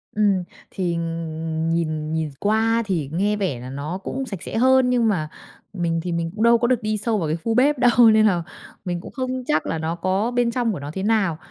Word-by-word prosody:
Ừm, 200 -3 +2 0.3
thì 175 -3 -2 0.8
nhìn 155 -2 -2
nhìn 160 -1 -1
qua 225 +2 +2
thì 170 -9 -2
nghe 205 +5 +1
vẻ 185 -12 -2
là 125 +1 -8
nó 145 +6 -4
cũng 270 +6 -3
sạch 195 -8 -6
sẽ - - -4
hơn 260 +1 +4
nhưng 245 -2 +2
mà 165 -8 0 0.4
mình 170 -3 -1
thì 180 - -3
mình 170 -1 -2
cũng 220 - -1
đâu 235 0 +6
có 240 - +1
được 245 -1 +1
đi 215 0 -1
sâu 220 +1 0
vào 170 -6 -1
cái 155 +2 -1
khu 230 - 0
bếp 280 +4 +3
đâu, 245 - +5 0.2
nên 215 0 +5
là 180 -5 +2 0.4
mình 175 -1 -3
cũng - - -10
không 255 -1 -3
chắc 155 - +1
là 165 - -2
nó 160 +1 -2
có 190 +6 0
bên 245 -1 +1
trong 240 -2 0
của 180 - -5
nó 145 +1 -6
thế 190 - -4
nào. 205 -7 +1
200 Hz, 235 wpm, -22 LUFS, 165-230 Hz, 0.8 s, đâu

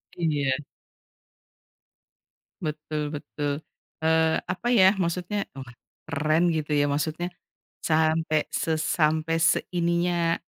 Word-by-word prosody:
Iya. 145 -6 +1 2.0
Betul, 155 -1 -3
betul. 145 0 -3 0.4
Eee, 160 0 +3
apa, 235 +6 -3
ya, 190 -4 +7
maksudnya, 180 +3 -1
wah, 130 -2 -9 0.4
keren, 155 +3 +2
gitu 155 -2 -1
ya, 145 0 +3
maksudnya 155 +4 -1 0.5
sampai 155 -1 +2
sesampai 160 0 +1
seininya, 170 0 +1
160 Hz, 85 wpm, -26 LUFS, 150-170 Hz, 2.0 s, ya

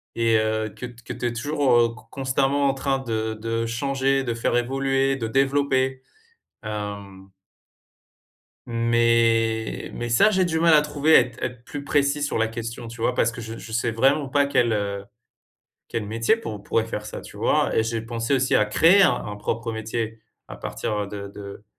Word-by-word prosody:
et 115 -1 +2
heu, 110 0 0
que - - -6
t 120 -1 -12
que - - -5
tu - - -5
es 120 - -2
toujours 120 -3 +2
con 110 0 -17
constamment 135 +1 +1
en 135 - +2
train 135 0 -1
de 110 -3 -2
de 115 +1 -2
changer, 135 +3 0
de 120 - -1
faire 115 +1 -1
évoluer, 135 +2 +1
de 115 -4 -3
développer. 135 0 +1 0.6
Hem 100 -2 -6 1.4
Mais 115 -1 +1
mais 120 - -4
ça, 120 - +5
j'ai 190 -2 +2
du 160 -2 0
mal 165 0 +5
à 150 - +7
trouver, 150 +1 +2
à - - +9
être 120 - -3
à - - +2
être 120 -1 -14
plus 145 -1 -6
précis 145 0 +1
sur 145 - -1
la 115 0 +2
question, 115 +1 -6
tu 115 0 -9
vois? 120 - +1
Parce 115 -1 +2
que 120 - -7
je 110 +1 -7
je 115 - -10
sais 120 0 0
vraiment 135 +5 +2
pas 145 +1 +3
quel, 120 -4 +2
heu, 100 -2 -2 0.8
quel 115 -2 -3
métier 115 - +2
pour 110 - -6
pourrait 110 +2 0
faire 105 -2 -5
ça, - - -6
tu - - -13
vois, - - +1
et 110 - +3
j'ai 115 0 -2
pensé 115 +3 -2
aussi 130 0 +2
à 105 - +4
créer 165 - +5
un 120 - +1
propre 115 +3 -3
métier 110 0 -4 0.3
à - - -8
partir 105 - -3
de 100 0 -7
de, 100 +1 -10
115 Hz, 195 wpm, -24 LUFS, 110-135 Hz, 1.4 s, à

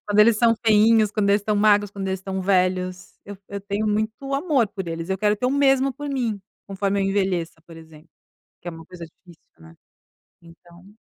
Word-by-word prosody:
quando 205 0 -1
eles 220 0 +5
são 230 0 +4
feinhos, 220 0 +4
quando 210 -1 0
eles 205 0 +2
tão 210 0 0
magros, 205 -1 +3
quando 195 -1 -6
eles 190 0 -3
tão 190 0 -4
velhos, 185 -1 -1
eu 205 0 -9
eu 200 0 -6
tenho 200 +2 -3
muito 220 +6 -2
amor 275 -4 +1
por 195 -4 -7
eles, 165 +2 -5
eu 190 - -1
quero 210 0 +1
ter 250 - -1
o - - +1
mesmo 270 -1 +2
por 290 +3 -7
mim, 235 -7 -2 0.3
conforme 195 0 -1
eu - - 0
envelheça 190 -4 -1
por 165 - -13
exemplo, 160 0 -16 0.5
que 175 - -11
é - - -3
uma 165 0 -12
coisa 170 -1 -10
difícil, 165 +1 -20 0.2
né, 80 0 -16 0.7
então. 175 +4 -18
200 Hz, 205 wpm, -22 LUFS, 180-215 Hz, 0.7 s, eles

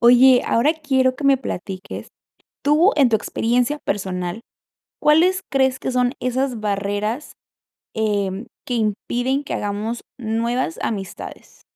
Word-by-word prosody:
Oye, 245 +1 +7
ahora 265 +7 +3
quiero 265 -5 +1
que 290 - -6
me 275 -1 +6
platiques, 190 -6 -6 0.6
¿tú, 310 +7 +5
en 275 -4 +5
tu 225 - +3
experiencia 245 +6 0
personal, 185 -3 -3 0.6
cuáles 350 +5 +4
crees 265 -1 +2
que - - -3
son 250 0 +1
esas 255 -1 -1
barreras, 205 +5 -2 0.6
em, 205 -1 -1 0.2
que 250 - -2
impiden 245 +5 -1
que - - -4
hagamos 210 +3 -3 0.2
nuevas 230 -3 -1
amistades? 195 -4 -6
240 Hz, 125 wpm, -21 LUFS, 210-265 Hz, 0.6 s, Oye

